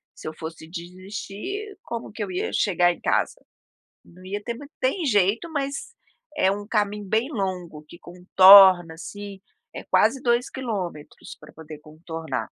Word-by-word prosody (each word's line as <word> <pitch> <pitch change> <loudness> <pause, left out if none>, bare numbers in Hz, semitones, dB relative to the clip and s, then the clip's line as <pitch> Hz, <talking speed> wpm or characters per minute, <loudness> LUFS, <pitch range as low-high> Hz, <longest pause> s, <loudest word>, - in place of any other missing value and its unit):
se - - -10
eu 155 - -5
fosse 160 0 -8
desistir 200 - -7
como 235 0 -6
que 210 0 -5
eu 190 - -6
ia 180 - -3
chegar 175 -3 +2
em 175 - -8
casa? - - -1 0.6
Não 180 +2 -17
ia 200 +2 -4
ter 235 - -4
ma 285 - -11
tem 290 +7 0
jeito, 210 - +1
mas 280 -2 -2 0.6
é 190 +1 +3
um 205 +1 -5
caminho 210 -2 -1
bem 225 +7 0
longo 180 - -4
que 170 - -13
contorna, 185 -1 +7
assim, 200 +3 -9 0.3
é - - -7
quase 270 - +2
2 240 +1 +1
quilômetros 195 - -6
pra - - -15
poder 155 -1 -11
contornar. 155 -3 -6
195 Hz, 160 wpm, -24 LUFS, 175-225 Hz, 0.6 s, contorna